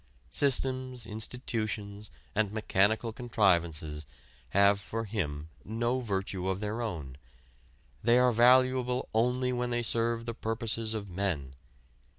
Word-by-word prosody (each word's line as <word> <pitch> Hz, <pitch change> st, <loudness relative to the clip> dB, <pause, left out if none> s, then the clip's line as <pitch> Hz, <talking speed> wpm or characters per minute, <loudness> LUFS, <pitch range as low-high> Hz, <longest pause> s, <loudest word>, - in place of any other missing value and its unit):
Systems, 130 Hz, -3 st, +1 dB
institutions 110 Hz, -2 st, -3 dB, 0.2 s
and 105 Hz, -1 st, +1 dB
mechanical 110 Hz, +1 st, +1 dB
contrivances 85 Hz, -, +1 dB, 0.4 s
have 100 Hz, +4 st, +4 dB
for 115 Hz, +3 st, -4 dB
him 80 Hz, -8 st, -3 dB
no 120 Hz, +4 st, -1 dB
virtue 95 Hz, -5 st, -2 dB
of 95 Hz, 0 st, -1 dB
their 105 Hz, +3 st, -3 dB
own: 80 Hz, -, -5 dB, 0.8 s
they 120 Hz, +2 st, +4 dB
are 125 Hz, 0 st, +5 dB
valuable 125 Hz, +1 st, +4 dB
only 125 Hz, +3 st, +1 dB
when 125 Hz, 0 st, -1 dB
they 120 Hz, 0 st, -1 dB
serve 115 Hz, 0 st, 0 dB
the 115 Hz, -, -3 dB
purposes 115 Hz, 0 st, -1 dB
of 105 Hz, -2 st, -4 dB
men. 85 Hz, -8 st, -2 dB
110 Hz, 120 wpm, -30 LUFS, 100-120 Hz, 0.8 s, are